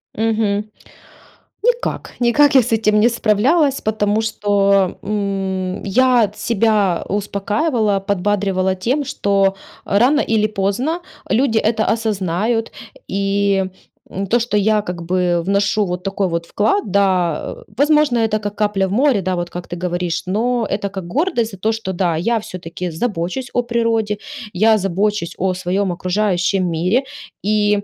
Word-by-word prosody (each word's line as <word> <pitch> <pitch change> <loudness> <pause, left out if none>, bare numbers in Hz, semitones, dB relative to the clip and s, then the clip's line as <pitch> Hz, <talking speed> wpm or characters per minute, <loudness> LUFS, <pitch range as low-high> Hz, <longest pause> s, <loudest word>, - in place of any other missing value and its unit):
Мгм. 215 -2 0 1.0
Никак, - - -1
никак 275 +4 +4
я 260 - +8
с 230 - -4
этим 215 -1 +3
не 230 - +5
справлялась, 260 +7 +2
потому 215 0 0
что, 200 -3 +1
м, 195 -2 -2
я 240 0 +3
себя 210 -6 +1
успокаивала, 205 - 0
подбадривала 195 -1 0
тем, 250 +10 -1
что 200 -7 +1 0.3
рано 250 +9 +3
или 215 -1 +1
поздно 215 - -1 0.3
люди 230 -2 +2
это 220 0 +1
осознают. 220 +1 -1 0.4
И, 200 0 +1 0.4
м, 195 +1 -4
то, 240 +5 +3
что 230 -3 0
я 210 +1 +2
как 180 -3 -6
бы 175 0 +1
вношу 200 +2 +1
вот 180 0 -4
такой 195 0 -1
вот 170 -1 -3
вклад, 205 -1 0
да, 185 -5 +1 0.2
возможно, 295 -2 +3
это 220 -2 +1
как 205 0 -5
капля 205 -2 +1
в - - -6
море, 245 -1 +3
да, 185 0 -1
вот 175 0 -3
как 175 0 -7
ты 175 - -5
говоришь, 175 -1 -2
но 230 +5 0
это 200 0 -2
как 190 -3 -6
гордость 245 - 0
за 195 - -10
то, 220 +4 0
что, 210 -4 -4
да, 175 -2 0
я 225 +8 0
всё-таки 180 -3 -6
забочусь 190 +6 -3
о 245 - +2
природе, 230 -3 0 0.4
я 215 +4 +4
забочусь 195 -1 -1
о 190 0 0
своем 185 +1 -1
окружающем 185 0 0
мире. 180 +11 +1 0.4
И 205 0 +2
205 Hz, 145 wpm, -18 LUFS, 190-225 Hz, 1.0 s, я